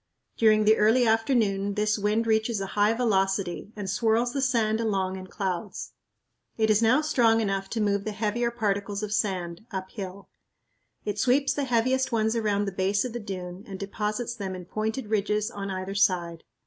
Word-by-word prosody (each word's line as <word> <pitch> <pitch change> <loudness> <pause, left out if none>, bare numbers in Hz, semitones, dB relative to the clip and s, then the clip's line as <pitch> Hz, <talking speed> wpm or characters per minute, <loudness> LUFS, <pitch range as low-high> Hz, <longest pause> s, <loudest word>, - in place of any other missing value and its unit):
During 215 -1 +4
the 215 +1 +5
early 225 +4 +4
afternoon 220 -4 +1
this 210 0 +1
wind 210 +3 +1
reaches 220 0 +1
a 195 - -2
high 210 +2 +3
velocity 195 -4 0
and 205 -2 -5
swirls 230 +3 +1
the 275 - -1
sand 230 -4 +1
along 195 -4 0
in 185 0 -8
clouds. 190 0 -4 0.7
It 220 -1 +3
is 215 +1 +3
now 240 +6 +4
strong 235 -7 +3
enough 195 -3 -1
to 225 - -2
move 200 -1 +1
the 215 - -3
heavier 220 +3 -1
particles 205 -3 -2
of 210 0 -3
sand, 180 -3 -2
uphill. 190 0 -6 0.8
It 210 0 -2
sweeps 265 +5 +3
the 285 - -1
heaviest 255 +2 +1
ones 220 0 +1
around 205 -3 +1
the 195 - -3
base 195 +3 0
of 245 - -5
the 240 - -3
dune 185 -3 -6
and 195 -2 -6
deposits 210 +4 -3
them 195 -5 -5
in 180 -1 -8
pointed 220 +6 -3
ridges 210 +1 0
on 200 -1 -5
either 190 0 -4
side. 175 -4 +1
210 Hz, 180 wpm, -27 LUFS, 195-225 Hz, 0.8 s, the